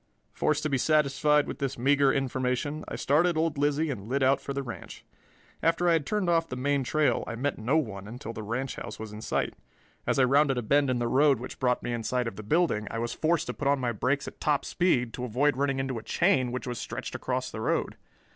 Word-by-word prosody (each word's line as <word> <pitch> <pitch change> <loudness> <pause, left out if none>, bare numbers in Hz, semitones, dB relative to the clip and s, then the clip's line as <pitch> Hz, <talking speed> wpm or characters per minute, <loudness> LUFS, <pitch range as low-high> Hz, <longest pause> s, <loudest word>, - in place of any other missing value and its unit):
Forced 150 -1 0
to 155 - 0
be 135 - +1
satisfied 150 0 +3
with - - -6
this 140 -1 -2
meager 140 +2 +4
information, 130 +2 -1
I - - -5
started 160 +4 +2
old 160 -2 0
Lizzie 145 +2 +1
and 110 -4 -7
lit 135 +1 +1
out 135 +1 +3
for - - -5
the 140 0 -2
ranch. 120 -3 -9 0.6
After 165 +2 +2
I 170 - +5
had 160 -4 0
turned 210 -3 0
off 165 -1 +2
the - - -4
main 140 +2 0
trail 155 +3 +1
I 115 - -4
met 140 +4 -2
no 125 +8 +2
one 100 -9 -3
until 115 0 -7
the 110 - -6
ranch 120 +5 -3
house - - -6
was 110 -1 -7
in 105 - -8
sight. - - -1 0.5
As - - +1
I 135 - +5
rounded 135 +1 +3
a 120 - -1
bend 140 +5 +3
in 130 - +1
the 120 0 0
road 135 +1 +4
which 125 - -8
brought 125 -2 +1
me 120 - -2
in 120 - -2
sight 125 +2 -1
of 115 - -5
the 105 - -7
building, 110 -3 +1
I - - -4
was 120 +1 -2
forced 160 0 +1
to - - -4
put 145 - -3
on 140 0 +4
my 125 -2 0
brakes 130 +6 -1
at - - -9
top 150 -2 +1
speed 125 -10 +1
to 125 - -5
avoid 125 +4 +1
running 140 0 0
into 135 -3 -2
a - - -10
chain 135 - +2
which 125 - -4
was 120 -2 -4
stretched 125 +2 -5
across 130 0 -2
the 110 - -6
road. - - 0
135 Hz, 250 wpm, -28 LUFS, 120-150 Hz, 0.6 s, I